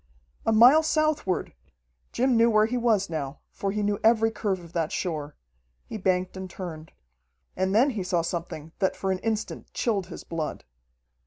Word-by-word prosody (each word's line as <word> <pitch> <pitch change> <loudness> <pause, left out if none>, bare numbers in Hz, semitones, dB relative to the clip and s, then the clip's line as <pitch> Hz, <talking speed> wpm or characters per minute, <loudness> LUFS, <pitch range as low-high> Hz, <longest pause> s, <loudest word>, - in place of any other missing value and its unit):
A - - +4
mile 245 +8 +7
southward! 310 - 0 0.6
Jim 255 0 +2
knew 230 +1 +5
where 215 -1 +4
he 235 +3 -2
was 225 -5 +2
now, 145 -4 -4
for 195 - -3
he 210 +1 -1
knew 205 0 0
every 225 0 +4
curve 200 -4 -2
of 170 -1 -14
that 165 -2 -1
shore. 150 -5 -3 0.5
He - - -6
banked 185 -2 0
and 190 0 -6
turned. 165 -4 -8 0.6
And 190 +2 0
then 260 +6 +5
he 220 -5 -3
saw 180 -2 0
something 165 -2 -5
that 190 -2 +1
for 195 - -2
an 185 - -1
instant 215 +1 -3
chilled 200 -6 0
his 175 - -9
blood. 165 -2 -4
195 Hz, 175 wpm, -26 LUFS, 175-225 Hz, 0.6 s, mile